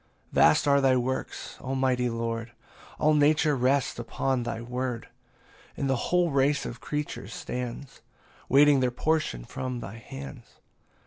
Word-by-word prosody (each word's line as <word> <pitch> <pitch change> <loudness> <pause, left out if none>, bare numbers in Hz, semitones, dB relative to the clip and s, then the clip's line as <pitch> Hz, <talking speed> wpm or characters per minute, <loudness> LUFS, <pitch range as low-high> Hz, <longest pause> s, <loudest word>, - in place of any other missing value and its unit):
PAUSE - - -38
III. - - -38
21 - - +8
Vast 75 - +2
are 140 0 +5
thy 130 -1 +4
works, 130 +1 -3
almighty 130 -2 0
Lord, 115 0 -3 0.4
All 155 - +3
nature 150 0 +4
rests 130 0 +1
upon 130 +2 -1
thy 115 -1 -3
word, 125 0 -4 0.7
And 140 - -1
the 135 - +2
whole 180 -2 +3
race 140 +1 +2
of 115 0 -7
creatures 145 -8 -4
stands, 125 +2 -6 0.5
Waiting 145 +1 +6
their 130 -1 +2
portion 125 - -1
from 125 -1 -4
thy 110 0 -8
hands. 70 - -10
130 Hz, 150 wpm, -27 LUFS, 120-140 Hz, 0.7 s, 21